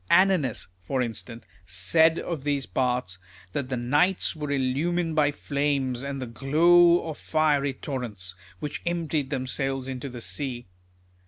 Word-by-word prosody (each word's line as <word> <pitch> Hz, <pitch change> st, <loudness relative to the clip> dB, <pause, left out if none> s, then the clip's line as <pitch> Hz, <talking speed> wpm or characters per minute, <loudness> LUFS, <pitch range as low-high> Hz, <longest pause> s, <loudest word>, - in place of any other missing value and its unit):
Annonus, 175 Hz, -, +3 dB, 0.2 s
for 125 Hz, +8 st, -1 dB
instance, 115 Hz, 0 st, -6 dB, 0.2 s
said 160 Hz, -, +3 dB
of 165 Hz, -6 st, -4 dB
these 145 Hz, -2 st, 0 dB
parts, 125 Hz, -8 st, -1 dB, 0.3 s
that 135 Hz, -3 st, -2 dB
the 130 Hz, -, -1 dB
nights 145 Hz, +11 st, +2 dB
were 150 Hz, -2 st, -4 dB
illumined 155 Hz, +5 st, 0 dB
by 150 Hz, -2 st, +4 dB
flames, 140 Hz, -3 st, -1 dB
and 140 Hz, 0 st, -4 dB
the 130 Hz, -, -3 dB
glow 170 Hz, +8 st, +4 dB
of 155 Hz, -, -5 dB
fiery 145 Hz, -3 st, +1 dB
torrents, 110 Hz, -11 st, -4 dB, 0.3 s
which 150 Hz, 0 st, -4 dB
emptied 160 Hz, -5 st, -1 dB
themselves 135 Hz, 0 st, -2 dB
into 130 Hz, +1 st, -5 dB
the 125 Hz, -1 st, -8 dB
sea. 125 Hz, 0 st, -4 dB
140 Hz, 140 wpm, -26 LUFS, 125-155 Hz, 0.3 s, by